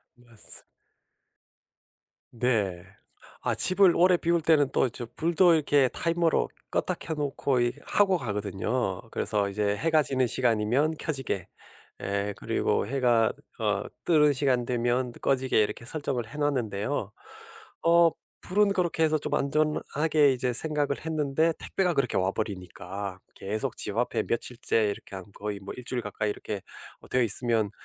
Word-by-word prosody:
맞습 120 -3 -7 1.7
네. 110 -8 0 0.6
아 - - 0
집을 185 -1 +5
오래 180 +1 +5
비울 170 0 +1
때는 155 -3 +3
또 130 - +2
저 120 0 -6
불도 170 +2 +4
이렇게 145 -3 +3
타이머로 170 +2 +1 0.2
껐다 - - -1
켜 160 - -4
놓고 140 -3 -1
이 120 - +2
하고 195 -3 +3
가거든요. 105 - -2
그래서 100 -2 0
이제 105 0 0
해가 160 +2 +3
지는 130 -2 +1
시간이면 125 +6 +1
켜지게 135 - -2 0.6
예 100 +1 -1
그리고 - - 0
해가 120 -4 +2 0.3
어 105 -2 0 0.2
뜨는 150 -3 +5
시간 130 -3 +1
되면 120 +1 0
꺼지게 130 -3 +2
이렇게 115 +2 -2
설정을 135 -5 -3
해 150 - -9
놨는데요. 120 -5 -1 0.7
어 170 0 +6 0.3
불은 200 +1 +2
그렇게 170 -3 +1
해서 155 0 +3
좀 - - -4
안전하게 150 0 +2
이제 125 -1 -1
생각을 145 +1 -1
했는데 155 +1 +1
택배가 180 -3 0
그렇게 135 -5 0
와 95 +1 +1
버리니까. 95 -1 -5 0.2
계속 110 +6 -3
집 105 +1 -3
앞에 120 - 0
며칠째 115 -1 0
이렇게 100 -1 -5
한 95 -1 -7
거의 105 -1 -5
뭐 95 - -8
1 125 - -9
주일 125 -1 -2
가까이 105 0 -3
이렇게 105 -1 -5 0.4
뭐 - - -16
되어 125 -1 +2
있으면 110 -1 +1
125 Hz, 300 characters per minute, -27 LUFS, 105-155 Hz, 1.7 s, 어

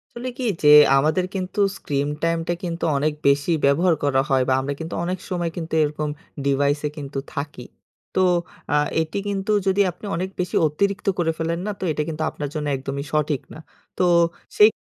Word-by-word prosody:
আসলে 245 +2 -4
কী 260 - -4 0.2
যে 150 - +6 0.3
আমাদের 155 +6 +2
কিন্তু 185 +1 -3 0.2
স্ক্রিন 140 0 -2 0.2
টাইমটা 165 0 0
কিন্তু 170 -1 -4
অনেক 150 +2 +1
বেশি 140 +4 +3
ব্যবহার 165 +5 +4
করা 135 -2 +3
হয় 135 -1 +3
বা, - - +4
আমরা 140 +2 -2
কিন্তু 165 +1 -5
অনেক 180 +1 -2
সময় 175 -3 -1
কিন্তু 165 -2 -5
এরকম 150 0 -2 0.4
ডিভাইসে 145 +2 +1
কিন্তু 140 -1 -4
থাকি। 140 -3 -5 0.5
তো 185 - +3 0.5
আ - - +4 0.3
এটি 160 +4 -4
কিন্তু 200 +1 -1 0.2
যদি 190 +1 +3
আপনি 195 - -13
অনেক 185 +3 -2
বেশি 180 0 -2
অতিরিক্ত 200 +7 -1
করে 165 -2 +2
ফেলেন 165 +1 -1
না - - 0
তো - - -5
এটা 150 - -1
কিন্তু 160 0 -3
আপনার 145 -1 -5
জন্য 150 -1 -2
একদমই 135 +1 -4
সঠিক 150 -2 +1
না। - - -10 0.4
তো - - +2 0.5
সেই 210 +1 +9
155 Hz, 180 wpm, -23 LUFS, 145-180 Hz, 0.5 s, সেই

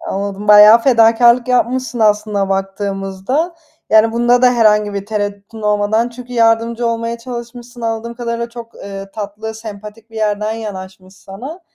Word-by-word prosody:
Anladım, 200 +1 -5
bayağı 210 +2 +9
fedakârlık 235 0 +4
yapmışsın 250 0 0
aslına 210 -2 +1
baktığımızda. 195 - -2 0.4
Yani 220 +1 +5
bunda 240 +1 +2
da 250 -1 +5
herhangi 210 -3 +3
bir 200 0 -4
tereddütün 205 +1 -5
olmadan 210 +2 +1
çünkü 250 +1 -11
yardımcı 230 0 +1
olmaya 230 0 -2
çalışmışsın 240 0 -9
anladığım 230 0 -3
kadarıyla 235 -1 -4
çok, 235 -1 -11
eee, 195 0 -9
tatlı, 215 +2 -6
sempatik 215 0 -10
bir 225 - -12
yerden 210 0 -1
yanaşmış 190 -3 -8
sana. 250 - -10
220 Hz, 140 wpm, -16 LUFS, 205-235 Hz, 0.4 s, bayağı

